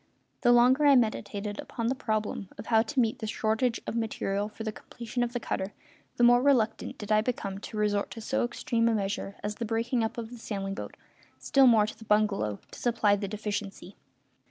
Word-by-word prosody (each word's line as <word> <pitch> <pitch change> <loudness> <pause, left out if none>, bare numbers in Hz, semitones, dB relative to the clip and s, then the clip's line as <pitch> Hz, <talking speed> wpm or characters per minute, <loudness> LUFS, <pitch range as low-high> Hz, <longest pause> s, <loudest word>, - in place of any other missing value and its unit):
The 240 - +5
longer 255 +5 +5
I 280 - +7
meditated 210 -3 -1
upon 230 - -5
the 245 - +2
problem 215 -5 -2
of 205 - -8
how 220 -1 +4
to 240 +4 -2
meet 230 -2 +1
the 220 - -4
shortage 220 +3 0
of - - -4
material 210 -3 -1
for 220 +1 -8
the 215 - -2
completion 235 +2 -6
of 240 -1 0
the 245 - -2
cutter 195 -3 -3 0.4
the 240 - +2
more 245 +1 +7
reluctant 250 -5 +1
did 210 0 -6
I 215 0 +5
become 200 -5 -3
to 215 - -8
resort 205 -1 +1
to 230 - -8
so 220 - 0
extreme 235 -1 0
a 225 - +2
measure 200 -1 -3
as 210 0 -3
the 235 - -3
breaking 230 +2 0
up 220 - -3
of 230 -1 -5
the 245 - -9
sailing 195 -3 -4
boat, - - -7 0.4
still 270 -1 +4
more 220 -3 +6
the 220 +1 -8
bungalow, 210 - +1
to - - -10
supply 225 -4 +2
the 200 0 -3
deficiency. 205 -2 -5
220 Hz, 205 wpm, -28 LUFS, 205-240 Hz, 0.4 s, I